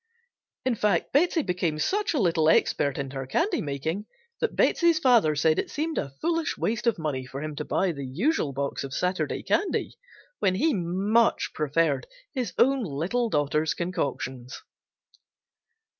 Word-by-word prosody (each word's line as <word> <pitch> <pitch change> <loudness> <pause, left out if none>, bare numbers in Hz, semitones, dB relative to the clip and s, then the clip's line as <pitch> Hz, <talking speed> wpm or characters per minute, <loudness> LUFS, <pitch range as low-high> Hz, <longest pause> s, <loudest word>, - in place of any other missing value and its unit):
In 260 - +2
fact 210 -2 0
Betsey 325 +2 +3
became 180 -5 -1
such 395 - 0
a - - +2
little 165 -6 +3
expert 140 -3 +2
in 140 -1 -4
her 135 -1 -5
candy 345 - 0
making 160 +8 -3 0.3
that 465 - -1
Betsey's 340 -2 +3
father 240 - +4
said 155 +2 +2
it - - -2
seemed 315 +2 -2
a 140 - -3
foolish 330 -1 -1
waste 230 +2 -1
of 230 - +3
money 150 -5 -2
for 135 +3 -7
him 155 -1 -5
to - - -2
buy 190 - +1
the 140 -3 -6
usual 175 - 0
box 140 +1 -3
of 135 -1 -6
Saturday 180 +1 -1
candy 405 - 0 0.5
when 185 - +2
he 310 +10 +2
much 195 +5 +1
preferred 150 - 0 0.3
his 250 -8 -2
own 270 0 +3
little 190 - -1
daughter's 150 -1 +1
concoctions. 135 -7 -4
180 Hz, 160 wpm, -26 LUFS, -, 0.5 s, father